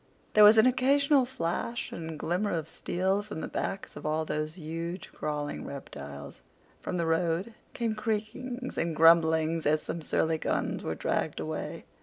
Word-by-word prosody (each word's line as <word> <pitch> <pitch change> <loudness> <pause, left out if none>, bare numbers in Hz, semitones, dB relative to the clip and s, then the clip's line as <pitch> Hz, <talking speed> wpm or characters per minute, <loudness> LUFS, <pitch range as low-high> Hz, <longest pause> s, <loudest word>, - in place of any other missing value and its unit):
There 210 - +7
was 210 +2 +9
an 220 - +7
occasional 270 +1 +4
flash 235 0 -3
and 160 -1 -6
glimmer 180 +7 -1
of 160 -2 -2
steel 190 +4 0
from 205 - -7
the - - -3
backs 195 - -4
of - - -8
all 155 +1 0
these 155 +1 -3
huge 165 +2 -5
crawling 150 -1 -3
reptiles. 70 - -8 0.4
From 180 - -3
the 170 - 0
road 165 +6 0 0.2
came 230 -2 0
creakings 230 +4 -3
and 165 -1 -1
grumblings 160 0 +5
as 155 +1 +2
some 170 - -4
surly 160 +1 0
guns - - -1
were - - -3
dragged - - -1
away. - - -4
170 Hz, 160 wpm, -29 LUFS, 160-215 Hz, 0.4 s, was